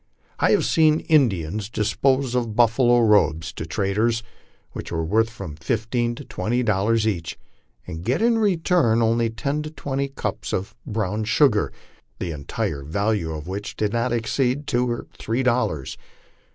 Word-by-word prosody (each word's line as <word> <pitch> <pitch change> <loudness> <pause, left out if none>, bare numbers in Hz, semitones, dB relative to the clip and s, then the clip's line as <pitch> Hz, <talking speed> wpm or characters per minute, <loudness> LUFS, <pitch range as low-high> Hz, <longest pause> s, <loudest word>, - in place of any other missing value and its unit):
I - - +3
have - - +3
seen 155 -1 +3
Indians 105 - +1
dispose 130 +4 +1
of 120 -4 -1
buffalo 120 +1 +4
robes 85 -7 +3
to 80 - -6
traders, 110 +5 0 0.5
which - - -7
were 80 -1 -1
worth 110 +6 +2
from 95 -9 -8
fifteen 115 - -1
to - - -9
twenty 120 +3 -1
dol 100 -4 +1
lars 115 0 +2
each, 85 -6 -2 0.5
and 80 -1 -7
get 125 +6 0
in 230 +1 +3
return 170 - +2
only 115 +1 +2
ten 140 +7 -2
to 155 - -5
twenty 140 -3 -3
cups 135 - -4
of 95 +3 -2
brown 105 0 -2
sugar, 120 -2 +3 0.5
the 85 -2 -4
en 70 -2 -9
tire 70 - -2
value 100 +4 -1
of 75 -1 -6
which 100 +3 -5
did 105 -1 -1
not 120 +1 0
exceed 125 +4 0
two 125 -2 0
or 120 - -3
three 115 +4 -1
dollars. 120 - 0
115 Hz, 165 wpm, -23 LUFS, 100-125 Hz, 0.5 s, buffalo